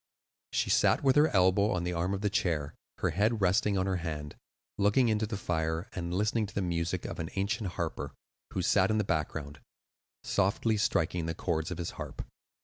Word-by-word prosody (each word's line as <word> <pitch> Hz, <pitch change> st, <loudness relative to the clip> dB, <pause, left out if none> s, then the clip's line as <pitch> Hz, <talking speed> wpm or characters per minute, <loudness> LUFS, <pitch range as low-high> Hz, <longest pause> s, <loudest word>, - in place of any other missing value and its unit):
She -, -, 0 dB
sat -, -, +4 dB
with 135 Hz, -1 st, +4 dB
her 150 Hz, +1 st, +6 dB
elbow 95 Hz, 0 st, +3 dB
on 90 Hz, -1 st, -1 dB
the 90 Hz, 0 st, -1 dB
arm 90 Hz, +3 st, 0 dB
of 100 Hz, -, -6 dB
her 105 Hz, -, +2 dB
chair, 80 Hz, -7 st, 0 dB, 0.2 s
her 90 Hz, -, 0 dB
head 105 Hz, +6 st, +1 dB
resting 100 Hz, +1 st, +2 dB
on 95 Hz, -, +1 dB
her 95 Hz, -1 st, 0 dB
hand, 75 Hz, -4 st, -5 dB, 0.4 s
looking 105 Hz, +5 st, +4 dB
into 110 Hz, 0 st, +1 dB
the 105 Hz, -1 st, -3 dB
fire 80 Hz, -2 st, -2 dB
and 85 Hz, -1 st, -4 dB
listening 105 Hz, +3 st, +1 dB
to 100 Hz, -, -13 dB
the 100 Hz, -, +1 dB
music 85 Hz, -2 st, -1 dB
of -, -, -5 dB
an 80 Hz, -1 st, -3 dB
ancient 100 Hz, 0 st, -1 dB
harper, 85 Hz, -3 st, -4 dB, 0.4 s
who -, -, -1 dB
sat -, -, +3 dB
in 110 Hz, -, +2 dB
the 105 Hz, -, +2 dB
background, 75 Hz, -4 st, -3 dB, 0.6 s
softly 105 Hz, +3 st, +1 dB
striking 85 Hz, -3 st, 0 dB
the 80 Hz, -, -2 dB
chords 80 Hz, -1 st, -1 dB
of 90 Hz, -, -4 dB
his 85 Hz, -1 st, -3 dB
harp. -, -, -6 dB
95 Hz, 200 wpm, -30 LUFS, 85-105 Hz, 0.6 s, her